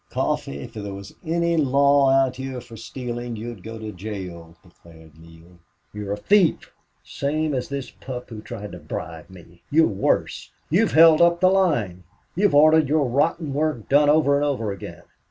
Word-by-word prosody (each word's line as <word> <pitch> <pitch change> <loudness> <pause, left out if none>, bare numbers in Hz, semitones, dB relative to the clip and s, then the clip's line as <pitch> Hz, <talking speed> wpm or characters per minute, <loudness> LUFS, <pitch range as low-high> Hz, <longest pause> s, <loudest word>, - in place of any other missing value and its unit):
"Coffee, 70 - -2
if 115 - -10
there 100 -3 -6
was 100 0 -10
any 170 +1 0
law 140 -1 +3
out 135 -1 +2
here 130 -1 -5
for 120 -1 -12
stealing 120 +1 -6
you'd 115 -2 -7
go 115 +3 -8
to 110 -1 -7
jail," 90 -4 -8
declared 80 -3 -18
Neale. 85 +2 -17 0.3
"You're 105 -1 -4
a - - -4
thief, 195 - +2 0.3
same 155 +2 -2
as 125 -2 -3
this 140 -1 -5
pup 125 -2 -9
who 110 -1 -7
tried 105 -1 -8
to 90 - -9
bribe 75 - -7
me. 85 -2 -16
You're 160 +2 +4
worse. 100 -3 -1 0.2
You've - - +2
held 160 +1 +7
up 170 0 +4
the 185 0 +4
line. 120 - 0 0.3
You've 195 -3 +2
ordered 155 0 +5
your 150 -1 +2
rotten 145 +3 0
work 145 -6 -2
done 145 +1 +4
over 150 -2 +4
and 145 - +1
over 130 -8 -1
again. 100 - -9
125 Hz, 175 wpm, -23 LUFS, 100-150 Hz, 0.3 s, held